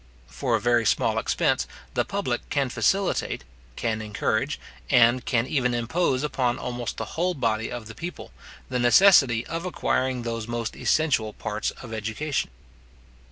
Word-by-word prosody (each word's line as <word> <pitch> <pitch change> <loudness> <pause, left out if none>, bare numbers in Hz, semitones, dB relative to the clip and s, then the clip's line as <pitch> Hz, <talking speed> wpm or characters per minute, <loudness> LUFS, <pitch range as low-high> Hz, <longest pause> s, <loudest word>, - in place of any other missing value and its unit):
For - - -1
a - - +1
very 120 -1 +3
small - - +2
expense, - - +1 0.3
the - - +2
public - - -3
can - - 0
facilitate, - - 0 0.3
can 110 -2 -1
encourage 110 +5 -1 0.3
and 120 -1 +5
can 120 -2 +1
even 125 -4 0
impose 130 +3 0
upon 130 -4 0
almost 120 -1 -4
the 110 - -3
whole 180 +2 0
body 115 -4 -1
of 120 -2 -5
the 110 - -9
people, 170 +8 -7 0.4
the 125 - -2
necessity 120 - +6
of 165 +1 -4
acquiring 130 -8 -1
those 115 -1 -3
most 120 -1 -3
essential 130 -9 +1
parts 110 0 -3
of 115 -2 -9
education. 110 +7 -2
120 Hz, 150 wpm, -25 LUFS, 115-135 Hz, 0.4 s, necessity